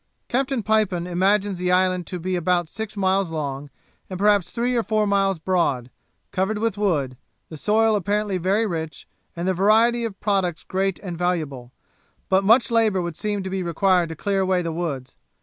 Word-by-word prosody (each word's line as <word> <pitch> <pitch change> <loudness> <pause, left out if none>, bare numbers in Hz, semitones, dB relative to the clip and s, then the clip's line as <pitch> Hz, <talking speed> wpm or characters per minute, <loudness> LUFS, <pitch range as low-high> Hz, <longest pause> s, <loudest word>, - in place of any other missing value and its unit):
Captain 260 -1 0
Pipon 210 -5 +1
imagines 190 +2 +1
the 180 0 0
island 185 -2 +2
to 180 - -4
be 185 +2 -2
about 175 0 +1
six 215 +4 -6
miles 190 -1 +1
long, 145 -2 -4 0.4
and 185 - -5
perhaps 200 -2 +3
three 245 +1 -1
or 235 - +2
four 215 0 0
miles 195 -2 +1
broad, 155 -8 0 0.4
covered 195 +3 -1
with 225 -1 -1
wood; 150 -11 -1 0.3
the 160 - -8
soil 215 +6 +2
apparently 205 0 -1
very 195 +6 +1
rich, 160 -5 -5 0.3
and 170 +1 -3
the 190 - +2
variety 225 +5 +3
of 220 -4 -5
products 190 -5 0
great 195 0 -1
and 175 -3 -6
valuable, 155 -9 -2 0.6
but 190 +1 +3
much 225 +2 +4
labour 220 -4 +3
would 175 -2 -3
seem 205 +1 -2
to 190 - -4
be 190 0 -2
required 180 0 +2
to 160 - -6
clear 195 +4 -1
away 185 -1 +1
the 165 - -2
woods. 145 -6 -4
190 Hz, 185 wpm, -23 LUFS, 175-210 Hz, 0.6 s, much